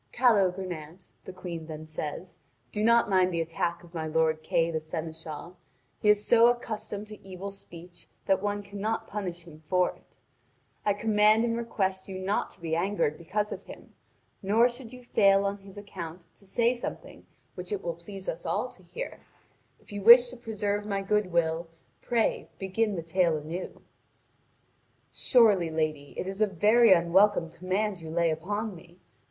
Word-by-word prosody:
"Calogrenant," 185 -7 0
the - - -7
Queen 175 -3 -7
then 155 -1 -7
says, 160 +3 -6 0.3
"do 210 - -2
not 235 +1 +5
mind 185 -2 +3
the 170 - -1
attack 165 +1 -2
of 170 0 -16
my 160 -2 -3
lord 160 0 +1
Kay 165 +1 +1
the 160 - -1
seneschal. 160 +1 -7 0.4
He 210 - +3
is 210 0 +4
so 235 0 +6
accustomed 215 -3 -2
to 215 - -11
evil 195 +1 -7
speech 175 -2 -13 0.2
that 190 -1 +2
one 205 0 -2
cannot 205 +2 -3
punish 180 -4 -5
him 155 -2 -14
for 180 +3 +1
it. - - -27 0.7
I 205 - +2
command 215 +1 +4
and 230 -1 0
request 195 -5 -2
you 190 - -5
not 190 +2 -1
to - - -14
be 160 -1 -1
angered 175 -3 0
because 205 +6 -2
of - - -7
him, - - -12 0.5
nor 220 +5 +4
should 240 -1 -8
you 250 -1 -11
fail 195 -4 +4
on 200 +1 -2
his 195 0 -13
account 175 -4 -8
to 195 - -19
say 235 +5 +2
something 240 - -7 0.3
which 180 +1 -8
it 200 -2 -2
will 170 - -2
please 190 +3 -10
us - - -4
all - - -1
to - - -19
hear; - - -7 0.6
if - - -19
you 205 0 -5
wish 240 +4 +9
to - - -9
preserve 210 -3 -2
my 200 -1 -2
good 210 -1 +1
will, 165 0 +1 0.3
pray 235 -2 0
begin 200 +2 -1
the 170 - -4
tale 170 -1 +2
anew." 160 +5 -6 1.3
"Surely, 210 -9 +4
lady, 155 -3 -2
it - - -2
is 195 +2 -4
a 215 - +5
very 210 +4 +5
unwelcome 175 0 +4
command 185 +3 -2
you 160 - -8
lay 170 0 +2
upon 205 +7 -3
me. 170 0 -15
190 Hz, 175 wpm, -28 LUFS, 170-210 Hz, 1.3 s, wish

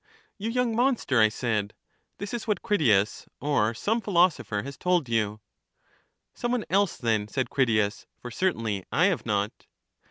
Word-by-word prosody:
You 215 +3 -2
young 245 -1 0
monster! 240 - +2
I 110 - +6
said; 110 -3 -2 0.4
this 200 +2 -6
is 235 -1 -4
what 210 - -1
Critias, 115 - +2
or 120 -6 +1
some 220 - 0
philosopher 170 - +1
has 140 0 -7
told 180 -1 +1
you. 110 -2 -1 0.9
Some 240 - -3
one 245 -3 -1
else, 200 -1 +2
then, 110 -3 0
said 130 +4 -2
Critias; 110 -5 +1
for 120 - -8
certainly 115 - -1
I 175 - +3
have 185 -10 0
not. 105 0 -2
135 Hz, 155 wpm, -27 LUFS, -, 0.9 s, I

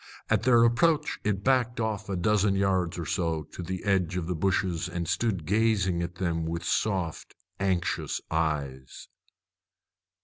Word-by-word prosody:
At 110 -2 +3
their 120 -1 +5
approach 150 +6 +2
it 100 -1 -1
backed 125 -2 +2
off 110 -2 -2
a 95 - -1
dozen 100 +2 +2
yards 95 -3 +1
or 85 - -4
so 80 -4 -1
to 75 - -9
the 90 +1 -5
edge 90 -3 +1
of 90 - -2
the 90 - -2
bushes, 90 -1 0
and 85 -1 -3
stood 90 -2 -1
gazing 100 -3 +2
at 85 0 -4
them 85 -3 -1
with 85 +1 -3
soft, 95 -7 -1 0.2
anxious 95 -3 -1
eyes. 70 -5 -2
95 Hz, 150 wpm, -28 LUFS, 85-105 Hz, 0.2 s, their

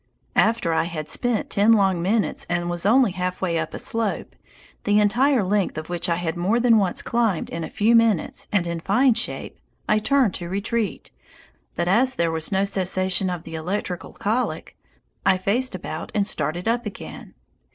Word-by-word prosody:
After 220 -7 +2
I 160 - +1
had 155 -3 -4
spent 245 -3 -1
ten 210 +3 +4
long 190 -5 +2
minutes 205 +4 0
and 175 0 -1
was 175 +2 -1
only 245 -1 +4
half 180 0 -3
way 170 -3 0
up - - -3
a - - -4
slope, 225 -3 -2 0.5
the 205 0 +3
entire 240 +4 +3
length 195 -3 0
of 155 +1 -6
which 175 0 0
I 170 - +2
had 165 -2 -3
more 190 +7 +1
than 235 -2 +5
once 190 -3 0
climbed 230 -7 0
in 165 0 -4
a - - -5
few 220 +3 +2
minutes 225 -6 +2
and 200 -4 +1
in 170 -1 -3
fine 245 +9 +3
shape, 230 - -4 0.3
I 215 - +3
turned 250 -1 +2
to 175 -1 -5
retreat, 205 +3 -2 0.6
but 170 - -1
as 245 +8 +3
there 170 -1 +1
was 160 +2 -2
no 195 0 +2
cessation 185 -1 0
of 175 -2 -4
the 165 - -10
electrical 180 +2 -4
colic, 230 +5 -2 0.5
I 190 -1 +4
faced 210 +6 0
about 165 -2 -6
and 205 -1 +2
started 170 0 -2
up 235 0 0
again. 205 - -9
195 Hz, 185 wpm, -23 LUFS, 175-225 Hz, 0.6 s, than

